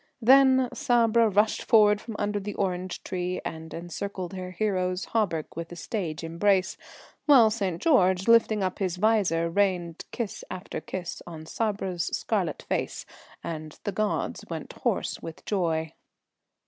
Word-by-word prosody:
Then 260 Hz, +1 st, +6 dB
Sabra 235 Hz, -5 st, +3 dB
rushed 210 Hz, +2 st, +2 dB
forward 210 Hz, -2 st, +5 dB
from 225 Hz, -2 st, -7 dB
under 205 Hz, 0 st, -1 dB
the 205 Hz, 0 st, -6 dB
orange 185 Hz, -1 st, -2 dB
tree 180 Hz, 0 st, -3 dB
and 160 Hz, 0 st, -6 dB
encircled 180 Hz, +2 st, -5 dB
her 185 Hz, -1 st, -5 dB
hero's 185 Hz, -1 st, -1 dB
hauberk 185 Hz, -9 st, 0 dB
with 165 Hz, +1 st, -6 dB
a -, -, -7 dB
stage 170 Hz, -3 st, -4 dB
embrace, 185 Hz, +3 st, +1 dB, 0.5 s
while 245 Hz, -7 st, +7 dB
St. 195 Hz, -6 st, -2 dB
George, 190 Hz, -, +3 dB
lifting 225 Hz, -3 st, +4 dB
up 185 Hz, -1 st, -2 dB
his 185 Hz, -3 st, -1 dB
visor, 190 Hz, -5 st, +2 dB
rained 175 Hz, -2 st, 0 dB
kiss 235 Hz, -5 st, -4 dB
after 185 Hz, +2 st, -6 dB
kiss 180 Hz, -2 st, -6 dB
on 160 Hz, -2 st, -8 dB
Sabra's 190 Hz, -4 st, -2 dB
scarlet -, -, -2 dB
face, -, -, -3 dB, 0.4 s
and 155 Hz, -2 st, -6 dB
the 205 Hz, -, -2 dB
"gods" 215 Hz, +1 st, -1 dB
went -, -, -6 dB
hoarse -, -, -2 dB
with 165 Hz, -1 st, -9 dB
joy. 165 Hz, -5 st, -1 dB
190 Hz, 145 wpm, -27 LUFS, 175-215 Hz, 0.5 s, while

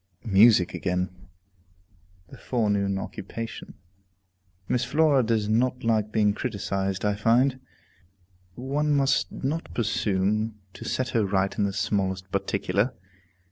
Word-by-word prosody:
Music 105 Hz, -2 st, +5 dB
again, 90 Hz, 0 st, -3 dB, 1.0 s
the -, -, -12 dB
forenoon 100 Hz, -5 st, 0 dB
occupation. 115 Hz, +4 st, -7 dB, 0.9 s
Miss 125 Hz, -, +1 dB
Flora 150 Hz, -3 st, +3 dB
does 110 Hz, -3 st, 0 dB
not 125 Hz, +4 st, +1 dB
like 110 Hz, -2 st, +1 dB
being 105 Hz, -2 st, +2 dB
criticized, 100 Hz, -4 st, -2 dB
I 105 Hz, -, +2 dB
find. 125 Hz, +5 st, +2 dB, 1.0 s
One 145 Hz, +4 st, 0 dB
must 140 Hz, +1 st, +2 dB
not 155 Hz, +5 st, -3 dB
presume 105 Hz, -1 st, 0 dB, 0.2 s
to -, -, -10 dB
set 130 Hz, -1 st, -1 dB
her 115 Hz, -3 st, +1 dB
right 95 Hz, 0 st, 0 dB
in 105 Hz, -, +1 dB
the 100 Hz, -, -1 dB
smallest 95 Hz, -2 st, -1 dB
particular. 100 Hz, +4 st, 0 dB
110 Hz, 115 wpm, -26 LUFS, 100-125 Hz, 1.0 s, Music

